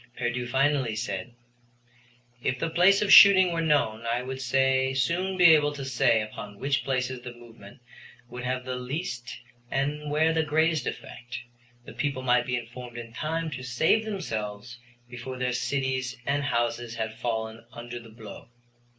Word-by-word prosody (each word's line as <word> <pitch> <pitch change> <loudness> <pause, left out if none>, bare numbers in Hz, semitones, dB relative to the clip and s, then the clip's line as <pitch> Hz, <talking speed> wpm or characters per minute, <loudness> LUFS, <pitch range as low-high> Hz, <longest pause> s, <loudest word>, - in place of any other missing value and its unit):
Pierdeux 120 0 -2
finally 135 -2 +1
said: 105 +1 -4 1.1
"If 130 - -1
the 160 +5 -2
place 195 +5 +4
of 200 - +4
shooting 190 -3 +9
were 165 - -1
known 140 -8 +1
I 120 +2 0
would 130 +1 -6
soon 135 +8 +1
be 175 -2 +8
able 145 -1 +3
to 140 -2 -6
say 125 -4 +2
upon 105 -1 -9
which 140 +3 0
places 130 -1 -2
the 120 -1 -9
movement 115 -3 -15 0.5
would 125 +1 -8
have 125 0 -2
the 130 0 -3
least 125 -1 -5 0.3
and 145 +2 -2
where 155 +2 +2
the 160 - +2
greatest 160 +1 +1
effect. 120 0 -7 0.5
The - - -10
people 140 -3 -2
might 125 -1 +2
be 125 0 0
informed 120 +1 -8
in 115 -1 -8
time 160 +3 -3
to 130 -2 -6
save 130 - +2
themselves 120 - -5 0.3
before 125 +1 -7
their 125 0 -1
cities 130 0 -2
and 140 0 0
houses 120 -2 -1
had 110 -1 -3
fallen 110 -1 -3
under 120 0 -8
the 115 -1 -14
blow." 110 -1 -12
130 Hz, 160 wpm, -27 LUFS, 120-145 Hz, 1.1 s, shooting